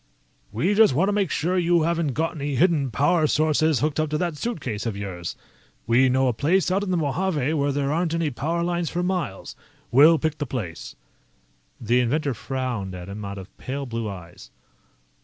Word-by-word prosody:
"We 150 - +1
just 210 - +5
want 190 +7 +2
to - - +1
make 200 -4 +1
sure 180 +6 0
you 170 -1 +3
haven't 165 -4 0
got 160 +5 -1
any 145 -3 -3
hidden 155 -3 +2
power 150 +7 +2
sources 155 -1 +2
hooked 150 0 0
up 155 -1 0
to 150 - -1
that 170 -1 -2
suitcase 135 - -4
of 105 -3 -3
yours. 90 -4 -5 0.5
We 125 +3 +4
know 130 +1 +2
a 125 - +1
place 175 - +1
out 195 +2 +1
in 200 - -4
the 180 - +1
Mojave 155 -1 0
where 145 -2 +1
there 140 +1 -1
aren't 165 0 0
any 165 -3 0
power 165 +7 -2
lines 175 -2 -1
for 175 0 -2
miles. 180 - -3 0.4
We'll 150 +7 +7
pick 155 -1 -2
the 145 - -2
place." 95 -11 -6 0.8
The 120 +2 +2
inventor 140 +3 0
frowned 120 -6 -4
at 90 +1 -8
him 105 +2 -7
out 100 0 -6
of 95 0 -11
pale 140 +2 -4
blue 115 -3 -4
eyes. 90 -3 -10
145 Hz, 195 wpm, -24 LUFS, 120-170 Hz, 0.8 s, We'll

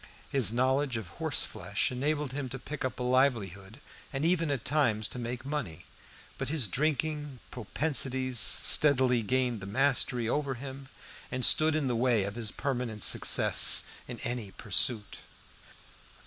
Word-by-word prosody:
His 130 -7 +4
knowledge 130 +1 0
of 105 -6 -7
horse - - +1
flesh - - -3
enabled 145 +1 -2
him 140 -2 -4
to 135 - -5
pick 145 +2 -7
up 130 -1 -4
a - - -3
livelihood, 115 - -1 0.3
and 140 +2 -3
even 165 -2 +1
at 135 -6 -3
times 120 -7 0
to 125 - -7
make 120 +1 -6
money; 140 - -5 0.5
but 135 -1 -3
his 145 -7 +1
drinking 150 - -2
propensities 130 - -2
steadily 130 -4 +4
gained 125 +1 -1
the 95 - -8
mastery 125 0 0
over 140 +2 -2
him 135 +1 -9 0.4
and 130 -1 -1
stood 155 0 +4
in 155 -2 -1
the 125 - -1
way 120 -3 +1
of 100 +1 -4
his 115 -1 -4
permanent 120 -6 -3
success - - +5 0.2
in 120 -2 -8
any 120 -4 -3
pursuit. 105 +3 -1
130 Hz, 150 wpm, -29 LUFS, 115-140 Hz, 0.5 s, success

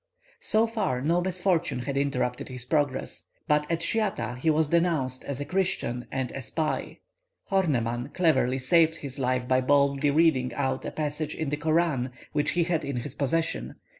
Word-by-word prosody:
So 220 +1 +2
far 210 - -1
no 165 +6 +1
misfortune 180 -3 0
had 135 +2 -3
interrupted 135 -3 -1
his 125 -1 -7
progress. 145 -1 -1 0.2
But 150 -1 +2
at 165 0 0
Schiatah 190 - 0
he 160 - +1
was 155 -1 +2
denounced 160 -7 +1
as 140 -2 -4
a 145 - -3
Christian 150 -9 -1
and 130 -2 -2
a 135 - -5
spy. 155 +4 -2 0.5
Horneman 125 -10 0
cleverly 130 -7 +2
saved 160 +5 +3
his 140 -1 -6
life 125 -1 0
by 130 0 +3
boldly 140 +1 +3
reading 140 -4 +3
out 130 -2 -1
a - - -3
passage 150 0 -3
in 160 -3 -2
the 150 - -1
Koran 155 -4 +1 0.2
which 145 -1 +1
he 170 - +4
had 165 -2 0
in 140 -2 -3
his 120 +3 -5
possession. 160 +4 -1
145 Hz, 170 wpm, -27 LUFS, 130-165 Hz, 0.5 s, he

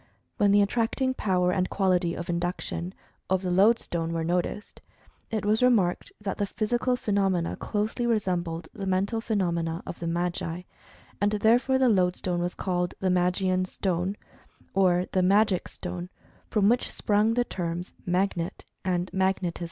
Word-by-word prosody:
When 205 -4 +4
the 205 0 +6
attracting 240 +5 0
power 180 -6 +1
and 185 0 0
quality 180 -3 +1
of 170 - -5
induction, 175 +1 -3 0.3
of 190 0 +1
the 180 - -1
lodestone 175 -4 +2
were 165 -1 -1
noticed, 180 +5 -2 0.5
it 215 -2 -2
was 215 +2 +2
remarked 215 -9 +2
that 205 -2 -4
the 205 - 0
physical 240 +5 0
phenomena 195 -6 0
closely 215 +3 -2
resembled 175 -7 -1
the 195 -2 -5
mental 195 +4 0
phenomena 170 -7 -1
of - - -7
the 170 - -4
Magi,' 175 0 -2 0.6
and, 205 +1 +2
therefore, 235 +5 +3
the 260 -1 +4
lodestone 180 -3 +1
was 175 +1 -2
called 180 -2 -1
"the 190 -1 +1
Magian 185 +1 +2
Stone," 185 +1 -2 0.6
or 180 -2 +3
"the 185 - +2
Magic 195 +1 +3
Stone," 180 0 -6 0.4
from 205 -2 +3
which 240 +3 +2
sprung 215 +2 +1
the 245 0 +2
terms 175 -2 -4
"Magnet" 180 -1 -1 0.2
and 180 -1 -1
"Magnetism." 190 -2 0
185 Hz, 150 wpm, -27 LUFS, 175-210 Hz, 0.6 s, the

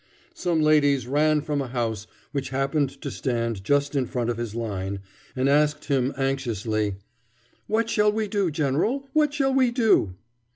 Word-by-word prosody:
Some 170 -3 0
ladies 145 -4 +3
ran 150 +3 +2
from 145 -1 -2
a 135 - -4
house, 115 -4 -3 0.2
which 140 -2 -3
happened 135 +1 0
to - - -4
stand 115 -5 -2
just 140 +6 +1
in 130 -3 +1
front 120 -1 -1
of 115 - -4
his 115 -2 -4
line, 100 -4 -3 0.3
and 130 +1 +1
asked 150 +1 +2
him 135 -2 +1
anxiously, 115 -6 -1 0.7
"What 225 +1 +1
shall 210 -2 +3
we 215 0 -1
do, 200 -3 0
general, 160 - 0
what 305 -2 +3
shall 275 -2 +1
we 260 -2 +4
do?" 225 - +2
140 Hz, 165 wpm, -25 LUFS, 120-170 Hz, 0.7 s, we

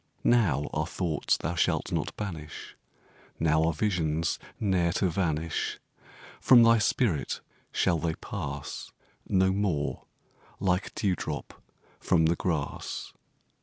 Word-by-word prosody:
Now 105 - +3
are - - 0
thoughts 80 -4 0
thou 80 - -3
shalt 85 - +1
not - - -2
banish 80 -8 -6 0.6
Now 80 0 +3
are 85 - +3
visions 80 -3 0 0.2
ne'er 90 -5 +2
to 95 -1 +1
vanish 80 -2 -1 0.6
From 120 -2 +7
thy 115 0 +6
spirit 105 - +1 0.3
shall 85 - +2
they 80 0 -1
pass - - -6 0.4
No 95 0 +4
more 95 -7 -1 0.5
like 90 0 0
dew 95 -3 +1
drops 75 -3 -5 0.5
from 80 -3 +3
the 85 +2 +3
grass. 80 -5 -3
85 Hz, 120 wpm, -28 LUFS, 80-95 Hz, 0.6 s, From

